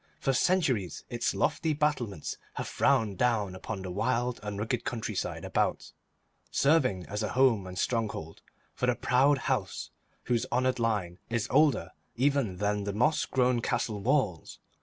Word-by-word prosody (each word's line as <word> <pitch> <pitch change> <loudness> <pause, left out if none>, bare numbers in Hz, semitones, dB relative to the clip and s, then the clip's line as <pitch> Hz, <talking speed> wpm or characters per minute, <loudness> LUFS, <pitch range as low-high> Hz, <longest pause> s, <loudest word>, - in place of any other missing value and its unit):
For 135 - +1
centuries 130 - +1
its 120 -1 -1
lofty 160 -2 +1
battlements 130 - -1 0.2
have - - -4
frowned 105 -4 +1
down 110 -6 +1
upon 95 +1 -6
the 95 - -5
wild 120 +5 0
and 105 -1 -5
rugged 115 +3 -2
countryside 110 -4 -3
about, - - -1 0.6
serving 130 - +2
as 105 +2 -4
a 105 - -2
home 125 -7 +3
and 90 0 -8
stronghold 105 -8 -2 0.3
for - - -1
the - - +3
proud 135 +3 +3
house - - -2 0.3
whose 120 -2 0
honoured 130 +1 +1
line 105 -6 -1
is 115 -2 -1
older 150 +1 +3 0.2
even 130 -7 +1
than 105 +1 0
the 100 - -2
moss 150 +9 +2
grown 125 -2 +2
castle 110 -3 -1
walls. 110 - 0
115 Hz, 150 wpm, -29 LUFS, 100-130 Hz, 0.6 s, home